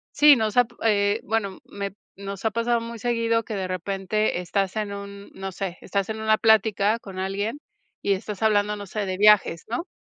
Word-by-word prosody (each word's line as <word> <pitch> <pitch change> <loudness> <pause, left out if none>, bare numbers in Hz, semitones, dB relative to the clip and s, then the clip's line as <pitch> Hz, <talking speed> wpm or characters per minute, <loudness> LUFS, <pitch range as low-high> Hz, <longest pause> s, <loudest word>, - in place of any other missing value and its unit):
Sí, 295 -1 +8
nos 220 -1 -1
ab 245 -2 +6 0.2
eh, 205 -1 +2
bueno, 200 -3 -2
me 200 -1 -5 0.2
nos 200 -1 -7
ha 220 - +2
pasado 230 +1 +1
muy 230 0 -7
seguido 230 0 0
que 220 - -6
de 190 -2 -2
repente 195 +2 -1
estás 190 +2 -1
en 210 -2 -2
un, 200 0 -8
no 195 0 -6
sé, 185 -1 -5
estás 200 0 -2
en 220 0 -4
una 220 0 +3
plática 220 -1 +3
con 195 -4 -9
alguien, 200 +7 -2 0.4
y 200 - +2
estás 200 +2 -5
hablando 210 -1 +2
no 205 -1 -8
sé, 210 +2 -3
de 185 -1 -3
viajes, 205 -5 +4
¿no?, 250 +10 -3
205 Hz, 200 wpm, -24 LUFS, 195-220 Hz, 0.4 s, Sí